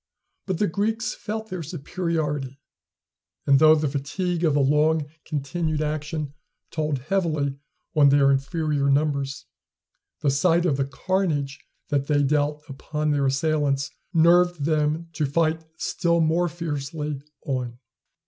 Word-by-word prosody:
But 190 -3 -1
the 210 - +2
Greeks 220 +5 -1
felt 220 -1 -6
their 185 -2 -3
superiority, 150 -4 -3 0.9
and 140 -1 +5
though 155 +1 +7
the 155 -1 0
fatigue 170 +6 -2
of 155 -4 +3
the - - +3
long 150 +2 +3 0.2
continued 155 +1 -2
action 150 -1 -3 0.4
told 155 -3 -1
heavily 155 -2 -1 0.4
on 145 -2 +6
their 140 0 +5
inferior 140 +1 0
numbers, 140 -1 0 0.8
the 145 -2 +2
sight 170 +5 +3
of 145 -6 +2
the 135 - +1
carnage 150 -2 -1 0.3
that 140 -1 0
they 145 -1 +3
dealt 150 +1 +1
upon 150 +2 -3
their 140 -2 +2
assailants 140 0 0 0.2
nerved 175 -2 +4
them 155 +1 0
to 150 -1 0
fight 160 +2 +1
still 170 -1 0
more 165 +2 +2
fiercely 150 -3 -4 0.2
on. 125 -3 -3
150 Hz, 130 wpm, -24 LUFS, 140-165 Hz, 0.9 s, though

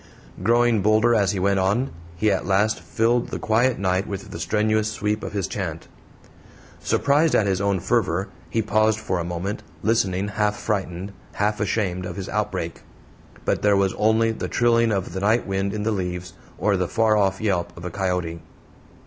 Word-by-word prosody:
Growing 120 +1 +3
bolder 110 +3 +4
as 100 -4 +3
he 100 - -3
went 100 +1 +2
on, 105 +8 +1 0.2
he 105 +5 +2
at 95 - 0
last 100 +3 +2
filled 115 +2 +1
the - - -4
quiet 120 +3 +2
night 95 0 0
with 100 -1 -6
the - - -6
strenuous 110 0 +1
sweep 105 0 -2
of - - -5
his 100 -4 -1
chant. - - -5 0.9
Surprised 145 +3 +2
at 105 - +3
his 95 -1 0
own 100 -2 +1
fervor, 90 +3 0 0.2
he 115 - 0
paused 110 +1 +2
for 95 -4 -2
a - - -1
moment, 90 +4 -4 0.2
listening, 100 -3 +1
half 105 +1 0
frightened, 95 -2 -3 0.2
half 105 +1 0
ashamed 95 -4 -1
of 90 - -6
his 95 -1 -5
outbreak. - - -3 0.6
But - - +1
there 105 -1 +4
was 95 -1 +2
only 110 +1 +2
the 110 - -4
trilling 115 -1 +3
of 95 -4 -2
the 95 - -3
night 110 +4 +2
wind 95 0 -1
in 105 0 -3
the 110 - +1
leaves, 90 -3 -3 0.2
or 100 +2 +1
the 90 -1 0
far 110 +2 +2
off 95 -2 +2
yelp 95 -6 0
of 85 - -8
a 90 - -4
coyote. 90 -3 -2
100 Hz, 185 wpm, -23 LUFS, 95-110 Hz, 0.9 s, bolder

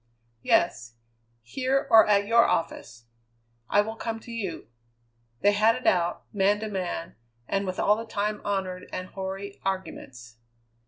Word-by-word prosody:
"Yes. 115 0 +1 0.5
Here, 265 - 0
or 220 -1 +8
at 200 -1 +3
your 230 +2 +5
office?" 120 - -2 0.6
"I 205 - +5
will 220 +2 -5
come 225 0 -4
to 235 - -11
you." 205 -7 -4 0.8
They 205 - +5
had 215 +2 +4
it 255 - -8
out, 175 -1 +2
man 205 +1 +2
to 220 - -3
man, 180 - -4 0.3
and 195 0 -1
with 185 - -4
all 210 - +4
the 225 +1 -6
time 210 -1 -2
honoured 190 -2 -3
and 185 0 -5
hoary 195 +1 -6
arguments. 130 -11 -5
200 Hz, 150 wpm, -26 LUFS, 185-220 Hz, 0.8 s, or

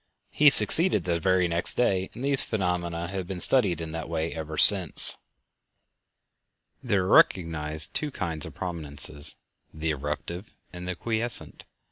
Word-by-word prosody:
He 150 0 +4
succeeded 170 +5 +5
the 85 -2 -3
very 90 +1 0
next 85 +1 -2
day, 95 -6 -1
and 125 - -7
these 140 -1 +1
phenomena 85 -4 -4
have 95 -2 -6
been 95 -1 -7
studied 100 -7 +4
in 80 -1 -7
that 80 0 -7
way 80 0 -4
ever 80 -1 -8
since. 95 -4 +5 1.6
There 105 -7 -1
are - - -4
recognized 80 -5 +2
two 150 - -2
kinds 85 - -4
of - - -14
prominences—the 75 -1 -4
"erruptive" 75 +7 -7 0.2
and 90 0 -9
the 90 - -4
"quiescent." 115 +4 -1
90 Hz, 140 wpm, -25 LUFS, 80-100 Hz, 1.6 s, succeeded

